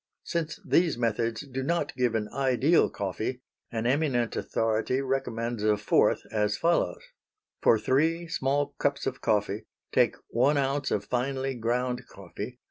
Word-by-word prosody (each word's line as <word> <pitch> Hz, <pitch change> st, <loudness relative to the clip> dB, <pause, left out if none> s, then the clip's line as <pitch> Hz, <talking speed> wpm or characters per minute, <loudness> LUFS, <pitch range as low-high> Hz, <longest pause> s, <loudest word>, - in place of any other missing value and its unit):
Since 165 Hz, -2 st, -3 dB
these 165 Hz, -7 st, +3 dB
methods 115 Hz, -1 st, 0 dB
do 135 Hz, -2 st, -5 dB
not 145 Hz, 0 st, -1 dB
give 125 Hz, -3 st, +1 dB
an 105 Hz, -1 st, 0 dB
ideal 135 Hz, +4 st, +3 dB
coffee 110 Hz, +6 st, -3 dB, 0.3 s
an 115 Hz, -1 st, -2 dB
eminent 125 Hz, -3 st, +1 dB
authority 115 Hz, +3 st, 0 dB
recommends 120 Hz, -4 st, -2 dB
a 105 Hz, 0 st, +3 dB
fourth, 105 Hz, -, +2 dB
as 105 Hz, -1 st, +1 dB
follows: 170 Hz, -, +1 dB, 0.6 s
For 115 Hz, -, +5 dB
three 160 Hz, +9 st, +1 dB
small 140 Hz, -1 st, 0 dB
cups 140 Hz, 0 st, 0 dB
of 130 Hz, -, -3 dB
coffee 105 Hz, -1 st, 0 dB, 0.2 s
take -, -, +3 dB
one 135 Hz, +5 st, +3 dB
ounce 140 Hz, 0 st, 0 dB
of -, -, -1 dB
finely 135 Hz, +2 st, -1 dB
ground 125 Hz, +1 st, -1 dB
coffee. -, -, -8 dB
130 Hz, 140 wpm, -28 LUFS, 115-140 Hz, 0.6 s, For